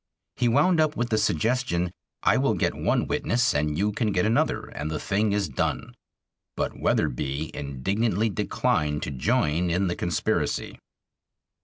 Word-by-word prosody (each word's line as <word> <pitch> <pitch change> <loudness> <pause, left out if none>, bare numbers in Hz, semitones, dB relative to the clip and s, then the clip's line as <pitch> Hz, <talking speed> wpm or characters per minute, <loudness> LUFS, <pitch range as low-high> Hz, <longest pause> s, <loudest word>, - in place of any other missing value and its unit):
He 125 - +1
wound 150 +8 +3
up 155 0 +1
with 120 0 -1
the 110 - +2
suggestion, 110 -7 0 0.3
"I - - +4
will - - +2
get - - 0
one - - 0
witness 120 +1 +1
and 75 +1 0
you 105 +3 +1
can 110 0 0
get 90 -1 +1
another, 115 +2 +1
and 75 +2 -5
the 80 - -2
thing 105 +1 0
is 100 -2 0
done." 65 - -2 0.6
But - - -2
Wetherbee 70 +4 -1
indignantly 100 - -1
declined 75 -4 0
to - - -3
join 75 +6 +1
in 90 +3 +1
the 85 - -1
conspiracy. 85 -3 -1
95 Hz, 155 wpm, -26 LUFS, 75-115 Hz, 0.6 s, I